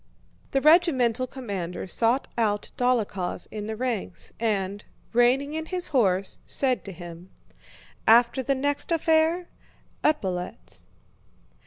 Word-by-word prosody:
The 270 - +1
regimental 265 -7 +4
commander 200 -10 -5
sought 230 +7 +1
out 210 -3 0
Dólokhov 225 -8 -1
in 210 -1 -5
the 220 - -3
ranks 230 -7 -4
and, 205 -3 -1 0.3
reining 255 +5 +3
in 320 0 -4
his 365 -1 -2
horse, 195 -8 +1
said 260 -3 0
to 200 - -5
him: 175 0 -10 0.8
"After 235 +3 +5
the 275 +1 0
next 285 +4 -1
affair... 325 +2 +2 0.6
epaulettes." 190 -13 -2
240 Hz, 115 wpm, -26 LUFS, 200-280 Hz, 0.8 s, After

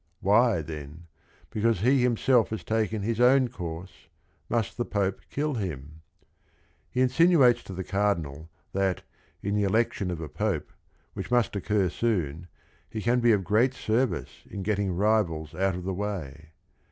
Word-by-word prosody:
Why, 105 -3 +3
then, 75 +2 -8 0.5
because 110 -3 +1
he 130 +4 +4
himself 125 0 +3
ha 110 - -2
s - - -9
taken 110 -2 -1
his 115 +2 -1
own 130 0 +5
course, 90 -5 -8 0.4
mu 115 -1 +2
st - - -12
the 120 - -1
Pope 100 -4 -1
kill 150 +1 -1
him 80 - -5
j - - -35 0.9
He 125 - -1
insinuates 130 -2 +5
to 95 - -8
the 95 - -4
Cardinal 85 -7 -1 0.2
that, 95 -2 0 0.4
in 100 - -1
the 105 - +1
elec 110 +4 +2
tion 95 - -3
of 85 -2 -3
a 80 - -5
Pope, - - -2 0.4
which - - -6
must 120 -3 +2
occur 100 -1 +1
soon, 85 -7 -1 0.4
he 110 - -5
can 120 +4 +2
be 120 -1 +4
of 100 -3 +2
great 115 +8 +2
service 110 - -1
in 100 - -5
getting 100 -1 0
rivals 90 -6 +1
out 95 +2 0
of 90 - -6
the 95 +1 -2
way. 85 -6 -5
100 Hz, 170 wpm, -27 LUFS, 90-115 Hz, 0.9 s, own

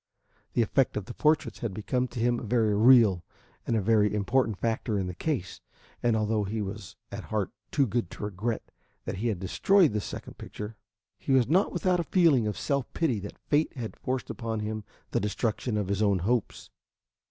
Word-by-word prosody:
The 120 - +3
effect 130 +3 +1
of 105 - -3
the 120 - -8
portraits 155 +3 +1
had 110 -5 -3
become 125 +4 -1
to 125 - -7
him 120 +1 +2
a - - -8
very 110 -2 +2
real 110 -5 +6 0.4
and 115 - +1
a 110 - +2
very 105 0 +3
important 110 +1 +1
factor 110 -1 -1
in 95 - -1
the 90 - -4
case, 110 - -3 0.4
and 120 -2 +2
although 110 -1 +1
he 105 +3 -3
was 100 -2 -6 0.2
at - - -6
heart - - -2 0.2
too 140 - +2
good 115 -4 -1
to - - -9
regret 105 +3 -3 0.3
that 95 - -4
he 115 +5 -1
had 110 -5 0
destroyed 170 - +3
the 105 - 0
second - - -8
picture, 105 +1 -7 0.4
he 135 - -1
was 130 -3 +4
not 185 +8 +3
without 180 0 +1
a - - +1
feeling 160 - +3
of 105 - -3
self 140 -3 -1
pity 135 -10 +1
that 100 +1 -8
fate 150 +1 +2
had 115 -3 -5
forced 130 0 -3
upon 115 -2 -3
him 110 0 -3 0.3
the - - +1
destruction 105 +2 -1
of 105 -2 -1
his 100 +1 -1
own 100 -2 +3
hopes. 120 -1 -1
110 Hz, 200 wpm, -28 LUFS, 105-125 Hz, 0.4 s, real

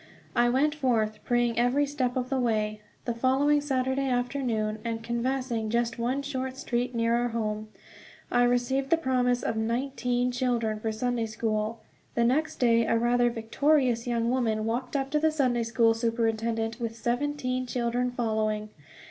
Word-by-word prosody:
I 240 0 +4
went 280 +5 +2
forth 230 -7 0
praying 240 -2 +1
every 250 +4 +3
step 265 -3 -1
of 250 0 -2
the 270 - +1
way, 215 -3 0 0.2
the 240 - -1
following 270 +5 +2
Saturday 265 -1 0
afternoon; 245 -4 -1
and 230 -1 -3
canvassing 235 -1 -1
just 235 +1 0
one 255 +4 -1
short 260 -2 -4
street 245 -1 -2
near 230 0 +2
our 240 +1 +1
home, 215 -2 -3 0.6
I 245 - +4
received 245 +3 +1
the 330 - +4
promise 250 -5 +1
of - - -1
nineteen 245 +1 0
children 240 -4 0
for 220 +1 -2
Sunday 235 +1 -1
school. 215 0 -2 0.3
The 235 - +3
next 280 +7 +1
day 230 -2 +3
a 230 - +3
rather 240 +1 +3
victorious 245 +1 +1
young 235 -1 +1
woman 225 -4 0
walked 245 +4 -2
up 270 -1 -1
to 300 - +2
the 315 +1 +3
Sunday 255 -6 +1
school 230 0 +3
superintendent 225 0 -1
with 230 -1 -3
seventeen 255 +1 -1
children 245 0 0
following. 215 -3 -1
240 Hz, 160 wpm, -28 LUFS, 230-260 Hz, 0.6 s, I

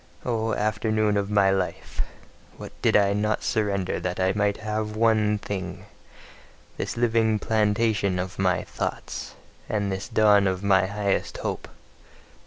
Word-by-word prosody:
O 115 -2 0
afternoon 110 0 +1
of 100 0 0
my 100 -2 +4
life! 95 -2 -2 0.6
What - - -8
did - - +4
I 100 -1 +3
not 105 +1 0
surrender 100 -4 0
that 90 0 -3
I 95 +1 +2
might 100 -1 +1
have 110 0 -3
one 110 -2 +3
thing: 100 -2 -5 0.9
this - - -4
living 115 -2 +2
plantation 105 -2 +1
of 90 0 -4
my - - +2
thoughts, - - -5 0.3
and 100 -2 0
this 95 +1 -4
dawn 105 -2 +4
of 95 +1 -2
my 95 -2 +4
highest 100 0 -1
hope! - - -4
105 Hz, 140 wpm, -25 LUFS, 100-110 Hz, 0.9 s, my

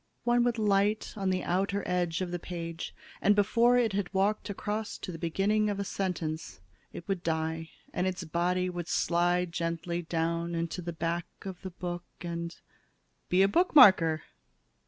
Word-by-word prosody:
One 240 0 +3
would 240 -1 +1
light 205 0 +1
on 195 -2 -1
the 185 -1 0
outer 195 +2 0
edge 175 -1 0
of 180 -1 -2
the 175 - -2
page, 170 -1 -6 0.3
and 205 - +5
before 230 +4 +4
it 230 -4 +2
had 195 -2 -1
walked 200 +2 +1
across 210 +2 -3
to 185 - -6
the 165 - -8
beginning 205 +6 +1
of 200 -1 -2
a - - 0
sentence, 180 -5 -3 0.3
it 170 - -9
would 195 -3 -1
die 160 0 -2 0.2
and 180 - 0
its 185 -1 -3
body 175 +2 0
would 175 -2 -4
slide 175 0 +1
gently 170 0 -2
down 170 0 -1
into 170 +2 -2
the 170 0 -4
back 170 +1 -2 0.2
of 190 -2 -7
the 190 - -5
book 175 -1 -5 0.2
and 170 0 -4 0.7
be 185 +2 +5
a - - +5
bookmarker!" 195 - +6
180 Hz, 170 wpm, -30 LUFS, 170-200 Hz, 0.7 s, bookmarker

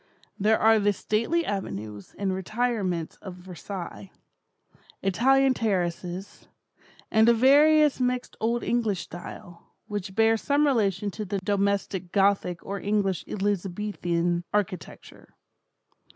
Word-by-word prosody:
There 215 +2 +3
are 220 0 +5
the 205 0 +2
stately 230 - 0
avenues 105 - -5
and 195 -2 -1
retirements 190 -4 -2
of 190 -3 -9
Versailles; 180 - -8 0.9
Italian 265 +8 +3
terraces; 185 -3 -3 0.6
and 220 +1 +5
a 235 - +5
various 295 +4 +5
mixed 250 0 -1
old 235 +2 0
English 220 -6 0
style, 175 0 -11
which 205 -3 -5
bears 225 0 +3
some 290 +1 +2
relation 205 -7 +1
to 215 - -5
the 200 0 -3
domestic 200 -2 -1
Gothic 195 -3 +1
or 200 0 -4
English 200 -3 0
Elizabethan 180 -3 -1
architecture. 190 -6 -4
200 Hz, 110 wpm, -26 LUFS, 180-225 Hz, 0.9 s, are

